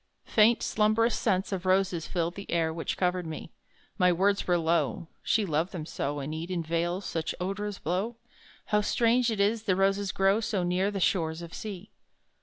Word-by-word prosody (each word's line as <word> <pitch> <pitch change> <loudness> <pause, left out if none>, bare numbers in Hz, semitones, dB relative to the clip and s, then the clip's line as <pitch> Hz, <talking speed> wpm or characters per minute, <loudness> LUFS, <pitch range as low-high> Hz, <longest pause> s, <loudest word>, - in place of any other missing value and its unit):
Faint 225 +2 +4
slumbrous 220 +2 +2
scents 195 -3 0
of 190 -2 -2
roses 185 -3 +1
filled 170 -1 -1
The 200 +1 -9
air 165 -2 +1
which 165 0 -3
covered 180 -1 0
me: 160 - -7 0.5
My 180 -1 +5
words 200 +3 +1
were 175 -1 +3
low 165 -1 0
"she 220 -2 +1
loved 165 +2 -1
them 165 -4 -5
so, 145 -2 -3
In 145 +3 -4
Eden 170 +2 -3
vales 170 +4 -1
such 160 -1 -3
odours 195 +2 -3
blow: 190 +8 -2 0.5
How 210 0 +2
strange 235 +3 +2
it 220 -3 -2
is 210 +3 +2
that 195 -4 +1
roses 195 +1 +1
grow 195 +2 +3
So 210 -4 -1
near 180 +3 +1
the 200 -1 -3
shores 165 -3 0
of 170 - -10
Sea!" 205 -2 -7
185 Hz, 185 wpm, -28 LUFS, 170-205 Hz, 0.5 s, My